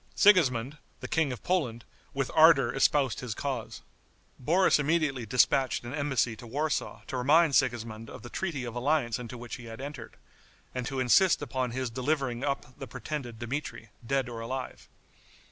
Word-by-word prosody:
Sigismond, 145 - +4 0.2
the - - -6
King 160 -4 +1
of 125 - -7
Poland, 125 -11 -1 0.3
with 135 -1 -2
ardor 160 -3 +6
espoused 135 -2 +2
his 120 -5 -5
cause. 130 -5 -4 0.6
Boris 170 +6 +3
immediately 150 -5 0
dispatched 125 +3 +2
an 120 +2 -7
embassy 135 -6 0
to 120 - -11
Warsaw 150 +5 -2
to 130 - -4
remind 150 +5 +4
Sigismond 115 -4 0
of - - -10
the 120 - -8
treaty 165 -9 -3
of 120 - -6
alliance 125 -2 0
into 125 0 -7
which 120 0 -7
he 120 - -11
had 115 0 -9
entered, 135 -4 -8 0.6
and 125 -2 -3
to 135 - -3
insist 150 +7 +4
upon 130 -2 -2
his 125 0 -3
delivering 130 -1 -1
up 140 -3 -3
the 135 - -6
pretended 120 -2 -6
Dmitri, 120 -2 -5
dead 135 +2 0
or 120 -2 -6
alive. 130 +3 -6
130 Hz, 165 wpm, -29 LUFS, 120-145 Hz, 0.6 s, ardor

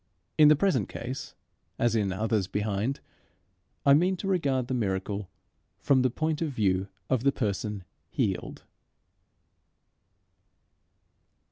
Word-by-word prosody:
In 155 -1 +7
the 150 - +7
present 150 - +1
case, 125 +3 -6 0.4
as 120 -1 +2
in 100 -4 +1
others 105 0 0
behind, 105 +6 -2 0.8
I 140 - +7
mean 180 +6 +3
to 195 - -5
regard 140 -9 +1
the 130 - -3
miracle 100 -3 -2 0.5
from 135 -2 +3
the 130 - +3
point 155 +5 -2
of 160 - 0
view 95 -4 +1 0.2
of 125 0 +1
the 140 - +4
person 105 -4 -2 0.3
healed. - - -2
120 Hz, 120 wpm, -28 LUFS, 105-140 Hz, 0.8 s, In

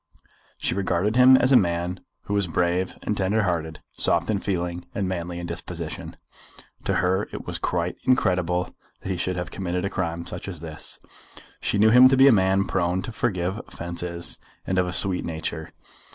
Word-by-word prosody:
She - - -1
regarded 100 +2 0
him 130 +1 +8
as 130 +1 +3
a - - +7
man 90 -3 +1 0.2
who 100 - -4
was 100 -2 +1
brave 90 +2 0
and 105 - -1
tender 100 +3 +1
hearted, 80 -4 -2
soft - - +1
in 100 - 0
feeling 90 -3 -2
and 100 -2 -1
manly 85 -1 -4
in 85 - -5
disposition. 85 0 -6 0.7
To 100 - +1
her 95 +2 +1
it - - -7
was - - -3
quite - - -1
incredible 90 -7 +1 0.3
that - - -6
he 95 - -1
should 90 +1 -1
have 90 0 -4
committed 90 -1 -2
a 100 - -2
crime 85 -2 -3
such - - -7
as 90 -5 -6
this. 80 -1 -8 0.6
She - - 0
knew 110 +2 +5
him 125 +2 +9
to 135 0 +3
be 135 +1 +7
a - - +8
man 95 -2 +3
prone 90 +1 0
to - - -5
forgive 95 -3 -1
offences, 85 0 -4 0.3
and 95 0 0
of 90 - +1
a - - -2
sweet 90 0 +2
nature." 80 -1 -4
90 Hz, 190 wpm, -24 LUFS, 85-100 Hz, 0.7 s, him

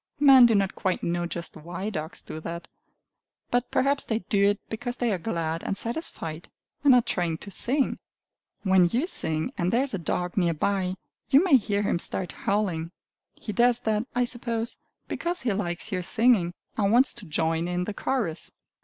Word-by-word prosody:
Men 270 -4 +8
do 225 - +2
not 195 -1 +1
quite 185 -1 -2
know 175 0 -1
just 170 0 -5
why 175 +6 -5
dogs 155 -3 -5
do 155 - -7
that. 170 +2 -6 0.8
But 245 0 +1
perhaps 275 +1 +1
they 220 - -1
do 200 -1 +2
it 205 - -1
because 245 +2 -4
they 240 -3 0
are 190 - -1
glad 165 -4 -2
and 195 - -3
satisfied, 185 - -4 0.3
and 275 -3 +7
are 245 - +4
trying 170 -6 -1
to 200 - -11
sing! 265 +7 +1 0.6
When 190 -3 +5
you 245 - 0
sing, 160 - +2
and 175 0 +1
there 240 +3 +3
is 275 - -4
a 195 - -2
dog 180 +2 -3
near 170 -3 +2
by, 185 +2 0 0.3
you 280 +4 +6
may 360 -7 +5
hear 205 -3 -1
him 185 - 0
start 180 +1 -3
howling. 185 -6 -1 0.5
He 215 - -6
does 240 +1 +3
that, 220 +2 0
I 245 0 +2
suppose, 235 -1 -3 0.3
because 350 +1 -2
he 230 -4 +1
likes 190 +1 -2
your 185 -2 -1
singing, 195 -3 +2 0.2
and 200 -1 +2
wants 250 +4 +4
to 235 -4 -11
join 160 +2 0
in 180 0 -1
the 205 - -4
chorus! 200 -7 -2
200 Hz, 190 wpm, -26 LUFS, 175-240 Hz, 0.8 s, Men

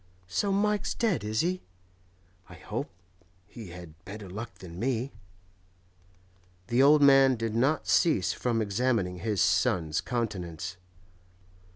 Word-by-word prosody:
So 195 - 0
Mike's 205 +1 +1
dead, 220 - 0
is 110 +1 0
he? 180 +2 -1 0.9
I - - -11
hope - - -5 0.6
he 110 0 -10
had 85 -1 -12
better 100 +1 -8
luck 105 +2 -7
than 90 -2 -10
me.' 125 +2 -1 1.6
The 120 +2 +3
old 145 +1 +6
man 135 -2 +6
did 115 -1 -3
not 135 +7 +1
cease 155 - +3
from 115 -3 0
examining 100 -3 0
his 105 +1 -1
son's 85 -4 +1
countenance. 95 -7 -4
115 Hz, 120 wpm, -28 LUFS, 95-135 Hz, 1.6 s, old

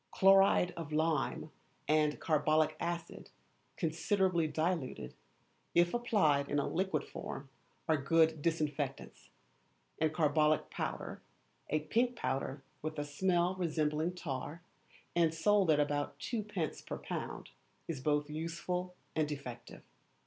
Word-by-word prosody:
Chloride 195 -2 +5
of 165 -3 -6
lime 155 0 0 0.4
and 150 -1 +2
carbolic 155 -1 +2
acid 170 0 -4 0.5
considerably 170 0 +1
diluted, 155 - -2 0.6
if 175 0 +4
applied 160 -13 +2
in 145 - 0
a 145 - +1
liquid 180 -5 0
form, 135 0 -7 0.4
are 160 -1 +3
good 160 +2 +3
disinfectants, 150 -4 -2 0.7
and 155 -1 +2
carbolic 155 -1 +2
powder - - -4 0.5
a 155 +1 +1
pink 235 +10 +1
powder 135 - -2 0.2
with 155 0 -4
a 145 - -1
smell 175 +4 +1
resembling 160 -1 0
tar, 150 0 -5 0.5
and 165 -2 +3
sold 200 +1 +3
at 150 -2 +5
about 145 -1 0
2d. 205 - -3
per - - -3
lb. - - -5 0.4
is 160 -5 -3
both 145 +1 +1
useful 170 +4 -3 0.2
and 155 -1 +1
effective. 125 -5 -7
155 Hz, 120 wpm, -34 LUFS, 150-175 Hz, 0.7 s, Chloride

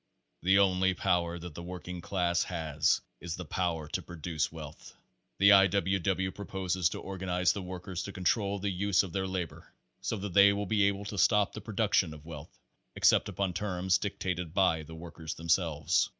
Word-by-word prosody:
The 95 +3 +4
only 95 -1 +3
power 85 -3 0
that 85 -1 -8
the 85 - -8
working 90 0 -7
class 85 -2 0
has 80 -3 0 0.2
is 85 0 -5
the, 90 - -7
power 80 -2 -2
to - - -2
produce 85 -1 -3
wealth. 75 -3 -10 0.4
The 100 +2 +6
I. 100 0 +8
W. 95 +1 +1
W. 95 +1 0
proposes 95 -3 -1
to - - -6
or 95 -1 -7
ganize 90 -1 +1
the 100 - -5
workers 90 0 -5
to 100 - -6
control 100 +2 0
the 100 0 -2
use 100 +2 +2
of 90 -4 -7
their 95 -1 -1
labor 90 -3 -5 0.3
so - - -2
that 100 -2 -5
they 100 +1 +7
will 100 0 -2
be 105 0 +2
able 100 0 -2
to 100 -1 -4
stop 105 0 +3
the - - -7
production 100 -6 +1
of 75 0 -14
wealth 80 -2 -9 0.5
except - - +4
upon 95 -2 -2
terms 95 -1 0
dictated 90 -4 -3
by 90 -5 +3
the 80 +1 -10
workers 80 -1 -7
themselves. 80 0 +1
90 Hz, 190 wpm, -30 LUFS, 85-95 Hz, 0.5 s, I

